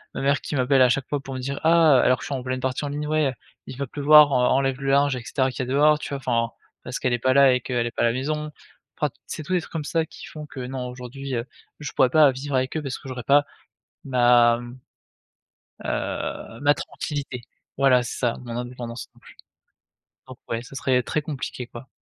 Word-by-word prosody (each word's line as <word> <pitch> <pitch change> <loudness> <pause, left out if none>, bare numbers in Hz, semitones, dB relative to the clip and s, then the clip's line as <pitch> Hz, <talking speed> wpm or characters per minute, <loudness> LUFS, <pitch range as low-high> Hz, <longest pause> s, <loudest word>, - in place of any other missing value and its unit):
ma - - -3
mère 140 +1 +2
qui - - -5
m'appelle 130 0 +3
à 125 - +6
chaque 130 +1 0
fois 145 - -1
pour 135 -1 -8
me - - -4
dire: 140 +2 -4
«Ah» 160 -4 +6
alors 125 - +4
que - - -10
je - - -6
suis - - -4
en 130 - -4
pleine 130 0 -3
partie 130 +2 -2
en - - -3
ligne, 145 +1 -3
«ouais, 150 -4 +1 0.3
il 130 - -8
va 140 - -2
pleuvoir, 150 +2 +6
en 125 -2 +3
enlève 135 0 0
le 135 - -1
linge, 140 0 +3
et 125 - -6
cetera 130 +1 0
qui 130 - -5
a - - -1
dehors», 150 +4 +3
tu - - -6
vois? 140 - -3
Enfin 115 -3 0 0.3
parce 125 - -4
qu'elle 130 - 0
est 120 - 0
pas 130 +2 +2
là 140 -2 +7
et 125 - 0
qu'elle 120 -1 -1
est 120 - -3
pas - - -3
à - - +4
la 115 - +2
maison. 150 +4 -3 0.5
Enfin, - - 0 0.2
c'est 155 - -6
tout 185 - -4
des 180 - +2
trucs - - -13
comme 160 -2 -3
ça 160 +2 0
qui - - -12
font 150 -1 -9
que 135 - -10
non, 125 0 -4
aujourd'hui, 130 +2 -6
heu, 115 0 -2 0.3
je 145 -3 -5
pourrais 130 - +3
pas 150 +1 +6
vivre 135 +2 -4
avec 130 +2 0
eux - - -2
parce 135 -2 -4
que - - -13
j'aurais 125 -1 -6
pas 145 +4 +4 0.6
ma, 120 -2 +4
mmh, 120 +1 -10 1.1
heu, 115 - -4
ma 145 0 +5
tranquillité. 140 -2 -5 0.4
Voilà 130 -2 +5
c'est 120 - -6
ça, 120 -3 0
mon 120 -1 -5
indépendance 120 -1 -6
non - - -22
plus. - - -17 0.9
Donc - - -11
ouais, 115 0 -3
ça 130 - -12
serait 130 -1 +1
très 155 - -1
compliqué, 140 -4 -5
quoi. 120 +2 -11
130 Hz, 245 wpm, -24 LUFS, 125-145 Hz, 1.1 s, là